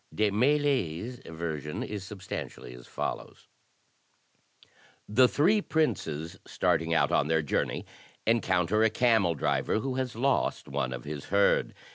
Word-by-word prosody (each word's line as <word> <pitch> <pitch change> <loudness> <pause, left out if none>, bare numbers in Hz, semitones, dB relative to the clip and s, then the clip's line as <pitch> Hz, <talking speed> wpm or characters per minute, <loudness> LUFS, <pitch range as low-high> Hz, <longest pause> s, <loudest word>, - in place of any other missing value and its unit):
De 105 -1 +2
Mailly's 125 - +1
version 80 -2 -4
is 105 -2 -5
substantially 95 -10 -7
as - - -13
follows: - - -5 1.6
The 125 +5 +5
three 190 - +3
princes, 85 - -1
starting 80 0 0
out 80 - +3
on - - +2
their 80 0 +2
journey, 70 - -1 0.4
encounter 105 -3 +2
a 110 - +5
camel 110 -7 +3
driver, 75 - 0
who 130 +4 -2
has 130 -3 -2
lost 135 +4 0
one 70 -2 -2
of 60 -1 -5
his 75 -1 -6
herd. 100 +1 +2
100 Hz, 130 wpm, -29 LUFS, 80-125 Hz, 1.6 s, The